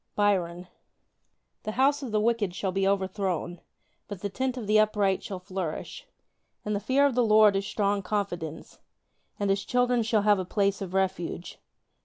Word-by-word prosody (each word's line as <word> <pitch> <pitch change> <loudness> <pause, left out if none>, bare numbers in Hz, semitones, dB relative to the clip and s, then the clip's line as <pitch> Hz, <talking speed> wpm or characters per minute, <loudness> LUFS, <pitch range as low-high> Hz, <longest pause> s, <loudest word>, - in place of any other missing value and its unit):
Byron 180 -4 0 0.9
The 215 - -4
house 275 +4 +2
of 260 -5 -5
the 215 - +2
wicked 215 -4 0
shall 190 0 -2
be 195 +1 0
overthrown: 190 -3 -1 0.5
But 200 -3 -7
the 205 - -2
tent 260 +4 -2
of 235 - -5
the 215 +1 +4
upright 210 -3 +2
shall 195 - -6
flourish. 180 -3 -6 0.6
In 210 - -1
the 205 - 0
fear 260 +7 +2
of 280 - +2
the 245 0 +2
Lord 215 -2 +5
is 195 +1 -1
strong 205 -2 0
confidence: 180 -5 -4 0.6
And 200 -1 +1
his 195 0 0
children 245 -1 +2
shall 220 -2 +1
have 205 -2 +4
a - - -1
place 200 +2 0
of 190 -1 -5
refuge. 190 -2 -2
200 Hz, 175 wpm, -27 LUFS, 190-215 Hz, 0.9 s, Lord